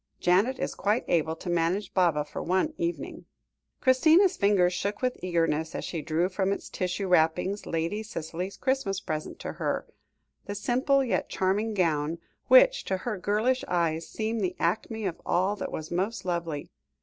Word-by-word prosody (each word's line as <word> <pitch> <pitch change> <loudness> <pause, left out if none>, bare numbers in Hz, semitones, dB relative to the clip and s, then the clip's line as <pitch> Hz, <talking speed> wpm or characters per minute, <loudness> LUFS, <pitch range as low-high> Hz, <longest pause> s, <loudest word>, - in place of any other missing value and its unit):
Janet 200 +9 +3
is - - -2
quite 210 +4 0
able 160 -1 +1
to 165 - -11
manage 175 +4 0
Baba 170 -6 +2
for 150 - -6
one 190 - 0
evening." 340 +1 -4 0.6
Christina's 320 +8 +5
fingers 195 -3 +3
shook 200 +5 -3
with 250 0 +1
eagerness, 165 -3 0
as - - -3
she 165 - -4
drew 165 +3 0
from 190 +1 -1
its 200 - -4
tissue 185 +2 -2
wrappings 180 +3 +2
Lady 165 +6 -1
Cicely's 180 -2 -5
Christmas 260 -8 0
present 155 -5 -4
to - - -5
her - - -1 0.6
the 205 - -4
simple, 260 +6 +2
yet 250 - -1
charming 205 +4 0
gown, 160 -3 +1 0.3
which - - +6
to 190 - -1
her 215 +3 -3
girlish 220 +7 +1
eyes 165 -2 0
seemed 225 0 -2
the 180 -2 -1
acme 215 +5 -1
of 175 -3 -3
all 190 +4 +1
that - - -4
was 155 0 -6
most 190 +6 -2
lovely. 170 -4 -3
190 Hz, 165 wpm, -28 LUFS, 170-220 Hz, 0.6 s, which